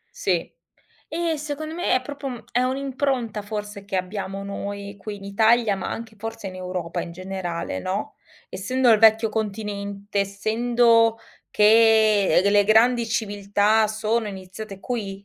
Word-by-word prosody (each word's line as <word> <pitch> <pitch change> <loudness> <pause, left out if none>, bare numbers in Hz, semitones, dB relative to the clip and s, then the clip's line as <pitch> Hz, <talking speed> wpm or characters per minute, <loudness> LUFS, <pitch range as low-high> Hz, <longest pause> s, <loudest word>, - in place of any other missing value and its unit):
Sì. - - -1 0.6
E, 330 0 -1
secondo 305 +1 -5
me, 350 +1 -1
è 255 - +1
proprio 285 +1 -7
uhm, 245 -3 -6
è 245 - +1
un'impronta 260 -4 -1
forse 210 -1 -6
che 200 -1 -7
abbiamo 190 +1 -4
noi 200 0 -6
qui 210 +1 -6
in 195 - -13
Italia, 220 +1 +3
ma 190 - -4
anche 225 -1 -6
forse 225 -2 -6
in 185 - -9
Europa 180 -2 -4
in 170 - -6
generale, 180 - -4
no, 190 - -3 0.3
essendo 245 +6 +1
il 220 - +6
vecchio 220 +1 +5
continente, 205 -1 -4
essendo 230 +3 +2 0.3
che, 215 -1 +5
ehm, - - +4
delle 200 +1 +4
grandi 230 +3 +4
civiltà 205 0 +1
sono 215 +1 -1
iniziate 195 +1 -8
qui, 200 -5 -5
215 Hz, 145 wpm, -23 LUFS, 200-230 Hz, 0.6 s, il